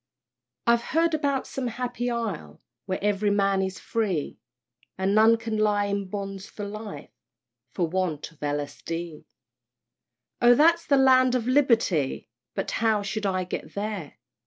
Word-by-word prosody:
I've 235 0 +4
heard 330 +6 +1
about 280 -3 0
some 265 -2 -4
happy 245 +1 -3
Isle, 205 - -4 0.3
Where 185 - -1
ev'ry 205 0 +1
man 195 -1 +2
is 190 -1 -3
free, 190 -5 -2 0.6
And 190 +1 +1
none 220 +2 +6
can 225 -1 -3
lie 205 -1 +2
in 200 -1 -2
bonds 195 0 -5
for 205 - -7
life 205 -7 -8 0.6
For 170 +8 -1
want 170 -3 -2
of 160 - -25
L. 145 0 -1
S. 145 -1 -9
D. 165 -2 -5 1.2
Oh 240 0 +7
that's 335 +4 +4
the 280 - +4
land 255 -1 +5
of 240 -3 0
Liberty! 230 - +2 0.2
But - - -2
how 220 -2 +1
shall 205 +1 -2
I 185 - 0
get 180 - -6
there? 200 -6 -4
205 Hz, 155 wpm, -26 LUFS, 185-240 Hz, 1.2 s, Oh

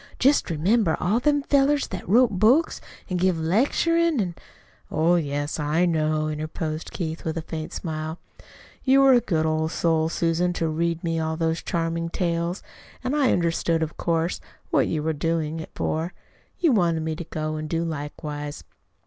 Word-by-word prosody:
"Just 275 -3 +3
remember 175 +3 +2
all 205 +7 +2
them 290 +2 +2
fellers 280 0 +3
that 190 - -6
wrote 240 +3 +5
books 255 - +3 0.3
an' 185 - -2
give 180 -1 +2
lecturing 290 - +2
an' 180 -4 -1 0.3
" - - -32
"Oh, 165 +3 +3
yes, 145 -2 -1
I 150 +4 +2
know," 155 -2 +1
interposed 155 +1 -4
Keith, 160 -2 -4
with 160 0 -3
a 160 - -3
faint 160 -1 -5
smile. 155 -1 -4 0.7
"You 270 +1 +5
were 270 -1 +7
a 245 - +5
good 160 -7 0
old 160 0 0
soul, 160 -1 +1
Susan, 170 +2 +1
to 165 -2 -1
read 165 +1 -1
me 165 -1 0
all 160 0 -2
those 165 0 0
charming 165 -1 -2
tales, 170 +1 -1 0.4
and 255 +3 -1
I 280 -4 +3
understood 165 -1 +1
of 160 - -4
course, 165 0 -1 0.3
what - - +3
you 155 -2 -1
were 160 0 0
doing 160 +1 -1
it 160 - -7
for. 160 +3 -2 0.4
You 335 -4 +4
wanted 170 -7 +2
me 160 0 -2
to 170 - -5
go 155 -1 -4
and 155 0 -5
do 165 +1 0
likewise. 150 - -5
165 Hz, 175 wpm, -24 LUFS, 155-185 Hz, 0.7 s, were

